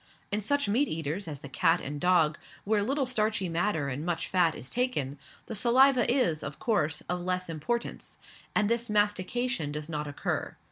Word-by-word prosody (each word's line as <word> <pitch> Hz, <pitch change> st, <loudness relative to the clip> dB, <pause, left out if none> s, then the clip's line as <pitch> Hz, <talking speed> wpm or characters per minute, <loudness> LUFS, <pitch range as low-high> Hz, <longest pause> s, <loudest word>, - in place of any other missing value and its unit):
In 210 Hz, +1 st, +1 dB
such 285 Hz, +4 st, +1 dB
meat 245 Hz, +8 st, +2 dB
eaters 160 Hz, +4 st, -3 dB
as 145 Hz, -4 st, -6 dB
the -, -, -7 dB
cat 135 Hz, -, +2 dB
and 145 Hz, +1 st, -6 dB
dog, 170 Hz, -4 st, +3 dB, 0.2 s
where 210 Hz, 0 st, +2 dB
little 270 Hz, +6 st, 0 dB
starchy 215 Hz, -5 st, 0 dB
matter 165 Hz, -3 st, 0 dB
and 140 Hz, +2 st, -3 dB
much 175 Hz, -1 st, -2 dB
fat 175 Hz, -4 st, +2 dB
is 125 Hz, -, -7 dB
taken, 150 Hz, -, -1 dB, 0.3 s
the -, -, -6 dB
saliva 250 Hz, +3 st, +5 dB
is, 235 Hz, -, +2 dB
of -, -, -6 dB
course, 160 Hz, -, 0 dB
of 180 Hz, 0 st, -2 dB
less 180 Hz, 0 st, -2 dB
importance, 165 Hz, +10 st, -3 dB, 0.4 s
and 210 Hz, -, +3 dB
this 235 Hz, +1 st, 0 dB
mastication 205 Hz, -, 0 dB
does 150 Hz, +1 st, -5 dB
not 150 Hz, -2 st, -3 dB
occur. 145 Hz, -, -3 dB
185 Hz, 180 wpm, -29 LUFS, 155-235 Hz, 0.4 s, saliva